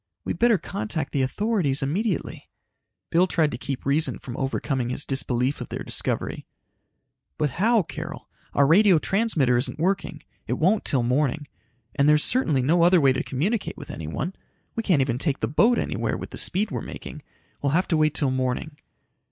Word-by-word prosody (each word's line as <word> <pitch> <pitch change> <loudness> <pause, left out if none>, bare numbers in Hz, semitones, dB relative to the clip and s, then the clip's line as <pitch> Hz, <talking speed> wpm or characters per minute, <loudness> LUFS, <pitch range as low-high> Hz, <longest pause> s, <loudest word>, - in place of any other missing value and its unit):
We'd - - -3
better 235 -3 +4
contact 145 0 -4
the 140 - +1
authorities 150 - 0
immediately!" 190 +11 -2 0.6
Bill 175 +2 +4
tried 160 -4 +1
to 120 - -4
keep 135 -2 -5
reason 145 +4 +1
from 120 - -8
overcoming 135 -2 -2
his 135 +3 -2
disbelief 135 0 -1
of - - -6
their - - -5
discovery. - - -2 0.9
"But 150 -3 0
how, 225 -1 +4
Carol? 160 0 -8 0.3
Our 140 - +5
radio 185 +4 +5
transmitter 160 - +1
isn't 125 +1 -1
working. 170 -2 -1 0.2
It - - 0
won't 195 +6 +1
till 130 -4 +1
morning. 140 +4 0 0.5
And 140 +1 +3
there's 150 0 +5
certainly 155 - +2
no 165 +6 +3
other 175 +1 +6
way 135 -3 +4
to - - -1
communicate 190 - -2
with - - -8
anyone. 80 - -4 0.4
We 230 - -1
can't 180 -10 +2
even 125 -2 -2
take 145 -2 -1
the 110 - -1
boat 225 - +3
anywhere - - -2
with - - -8
the - - -7
speed 200 +2 +2
we're 120 -4 -3
making. - - -8 0.4
We'll 140 0 0
have 180 +3 +2
to 160 - +2
wait 155 -1 +2
till 135 -3 +1
morning." 130 +3 -2
150 Hz, 180 wpm, -24 LUFS, 135-180 Hz, 0.9 s, other